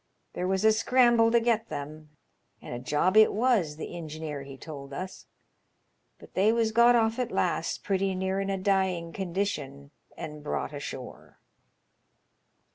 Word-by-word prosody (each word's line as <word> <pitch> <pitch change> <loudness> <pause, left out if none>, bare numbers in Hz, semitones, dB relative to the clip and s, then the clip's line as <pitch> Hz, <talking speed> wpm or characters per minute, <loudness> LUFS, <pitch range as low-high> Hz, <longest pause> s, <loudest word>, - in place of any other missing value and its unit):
There 180 - -2
was 190 +2 0
a 220 - +7
scramble 235 0 +4
to 235 +1 +4
get 230 -1 0
them; 150 +2 -7 0.5
and - - -8
a 120 - -4
job 150 +9 +1
it 220 0 +7
was, 215 -9 +1
the 160 - -7
ingeneer 155 -3 -6
he 135 -1 -10
told 140 -2 -9
us. 185 +4 -7 0.9
But - - -16
they 200 +4 +3
was 230 -1 +1
got 235 +2 +6
off 225 +1 +2
at 250 - -1
last, - - -1
pretty 195 -1 0
near 190 +1 -1
in 195 0 -2
a 195 - 0
dying 185 -3 0
condition, 170 -7 -3 0.3
and 150 -1 -7
brought 150 - -3
ashore." 140 -3 -8
190 Hz, 155 wpm, -28 LUFS, 150-220 Hz, 0.9 s, a